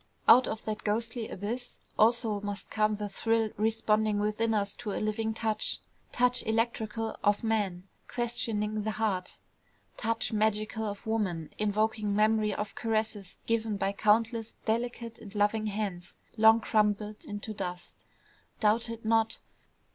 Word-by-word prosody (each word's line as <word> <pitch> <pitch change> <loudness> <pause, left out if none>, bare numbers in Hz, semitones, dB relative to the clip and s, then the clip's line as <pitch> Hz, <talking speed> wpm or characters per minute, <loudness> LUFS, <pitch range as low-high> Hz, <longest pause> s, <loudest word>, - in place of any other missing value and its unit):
Out 255 - +8
of 220 - -4
that 215 -1 -3
ghostly 225 +2 -1
abyss 235 +6 -5 0.2
also 220 -2 +3
must 205 0 -5
come 215 0 +2
the 210 0 -4
thrill 225 +1 +1
responding 215 0 +2
within 215 +2 0
us 200 -2 0
to 220 -4 -4
a - - -2
living 215 +1 -1
touch, 220 -1 0 0.3
touch 250 0 +3
electrical 225 -1 -1
of 205 +1 +2
man, 205 -5 0 0.2
questioning 220 -3 0
the 215 - -2
heart, 200 -5 -1 0.6
touch 225 0 -1
magical 215 +1 0
of 205 +2 -6
woman, 190 -8 -1
invoking 215 0 +1
memory 215 0 +3
of 210 +1 -3
caresses 215 -4 -2
given 225 -2 0
by 195 0 0
countless 225 +2 +1
delicate 230 0 -2
and 205 -1 -11
loving 210 +1 +2
hands 195 -4 -4 0.2
long 220 0 +7
crumbled 210 -1 +1
into 205 +1 -5
dust. 180 -3 -6 0.6
Doubt 225 +2 +2
it 230 -1 -7
not! 225 0 +2
215 Hz, 140 wpm, -30 LUFS, 210-225 Hz, 0.6 s, Out